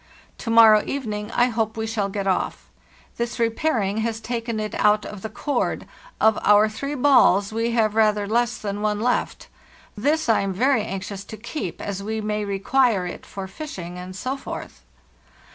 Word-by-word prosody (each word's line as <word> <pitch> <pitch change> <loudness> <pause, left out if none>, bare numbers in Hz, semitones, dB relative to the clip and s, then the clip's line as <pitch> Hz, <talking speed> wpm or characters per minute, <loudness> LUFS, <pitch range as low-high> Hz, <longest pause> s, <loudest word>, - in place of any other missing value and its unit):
To 230 - -5
morrow 225 -2 +7
evening 215 -6 -4
I 245 +1 +3
hope 225 -1 -2
we 220 - -2
shall 215 -3 -1
get 200 0 -3
off. 190 -2 -1 0.5
This 235 0 -3
repairing 230 -3 0
has 225 0 -1
taken 230 -1 -3
it 215 0 -4
out 210 0 +3
of 210 -2 -8
the 220 - -5
cord; 290 - -2 0.3
of 220 -1 +4
our 210 +1 +5
three 275 +7 -4
balls 235 -7 +4
we 230 +1 0
have 220 -3 +2
rather 210 -2 +3
less 240 +3 +1
than 205 -1 -4
one 210 -1 0
left. 245 +3 -1 0.5
This 295 +8 0
Iam 200 -4 +2
very 250 +3 +2
anxious 195 -1 -5
to 220 - -9
keep, 215 - -5
as 200 -1 -4
we 220 +2 -3
may 210 0 -2
require 200 +1 +1
it 175 - -7
for 195 -1 -6
fishing, 185 - -7
and 185 +1 -8
so 255 +7 -3
forth. 275 - -8
215 Hz, 175 wpm, -23 LUFS, 205-235 Hz, 0.5 s, morrow